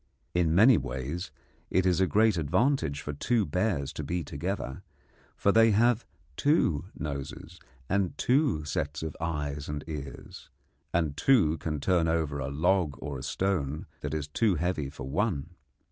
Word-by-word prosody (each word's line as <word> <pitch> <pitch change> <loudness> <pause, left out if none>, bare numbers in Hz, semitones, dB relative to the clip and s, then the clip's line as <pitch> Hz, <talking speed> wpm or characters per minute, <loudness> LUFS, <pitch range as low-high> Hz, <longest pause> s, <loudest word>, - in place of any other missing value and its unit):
In 85 -2 +2
many 110 +5 +7
ways 65 +8 -4 0.4
it 95 +1 +2
is 90 0 +3
a 95 - +4
great 110 +2 +4
advantage 80 - +1
for 75 - -5
two 110 +9 +1
bears 80 -4 -1
to 75 - -5
be 85 +4 -2
together, 70 -4 -4 0.6
for 100 - +3
they 115 +2 +6
have 115 +2 +3 0.3
two 90 - +2
noses 75 +3 -6 0.3
and 95 -1 0
two 130 - +2
sets 75 +1 -3
of 80 -2 -4
eyes 75 -3 -3
and 75 0 -4
ears, 75 -4 -8 0.4
and 80 -4 0
two 80 - +3
can 75 0 -3
turn 85 +2 +2
over 80 -3 0
a 65 0 -3
log 80 +1 +1
or 70 -1 -5
a - - -8
stone 75 -3 -1
that 75 +1 -3
is 75 -2 -3
too 100 +6 +2
heavy 80 -4 -1
for 65 -2 -8
one. 85 -1 -1
80 Hz, 160 wpm, -29 LUFS, 70-95 Hz, 0.6 s, many